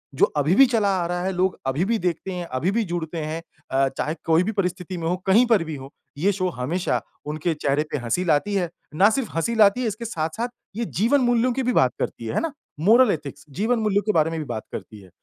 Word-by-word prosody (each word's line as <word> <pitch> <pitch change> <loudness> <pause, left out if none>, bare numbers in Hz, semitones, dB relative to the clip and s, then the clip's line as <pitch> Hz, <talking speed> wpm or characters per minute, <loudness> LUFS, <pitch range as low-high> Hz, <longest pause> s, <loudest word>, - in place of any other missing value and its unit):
जो - - +5
अभी 150 +5 +3
भी 270 - +8
चला 225 -5 +1
आ - - -1
रहा 175 0 -2
है, 190 - 0
लोग 185 +1 0
अभी 145 +8 +1
भी 230 +2 +1
देखते 180 +1 -2
हैं, 175 -1 -4
अभी 160 +7 -1
भी 230 +1 +1
जुड़ते 165 -1 -3
हैं। 155 +2 -3 0.3
अ, 135 0 +3
चाहे 155 +2 -1
कोई 165 +2 +4
भी 220 - -1
परिस्थिति 180 -2 -2
में 165 -1 -3
हो, 180 - +1
कहीं 225 +6 +6
पर 220 -7 +4
भी 160 -2 -5
हो, 135 0 -9 0.3
ये 195 +7 +2
शो 185 -1 -1
हमेशा 165 +6 -1 0.2
उनके 155 +3 -1
चेहरे 145 0 0
पे - - 0
हँसी 175 +10 0
लाती 170 +5 +2
है। 175 -3 0 0.3
ना 200 +6 +6
सिर्फ 230 -5 -2
हँसी 230 +8 0
लाती 215 +3 +5
है, 235 - 0
इसके 220 +3 -4
साथ-साथ 190 +5 -2 0.3
ये 235 +1 -2
जीवन-मूल्यों 245 +2 +2
की 265 +1 -1
भी 250 - +1
बात - - +4
करती - - -3
है - - -3
है - - +3
ना? 330 -3 -3 0.3
मोरल 225 +6 +5
एथिक्स 145 -2 -5
जीवन 230 +2 +2
मूल्यों 205 -2 +2
के 215 - +2
बारे 160 0 +3
में 165 - -3
भी 155 - -4
बात 115 -3 -4
करती 105 -2 -8
है। 95 - -16
180 Hz, 250 wpm, -23 LUFS, 155-220 Hz, 0.3 s, भी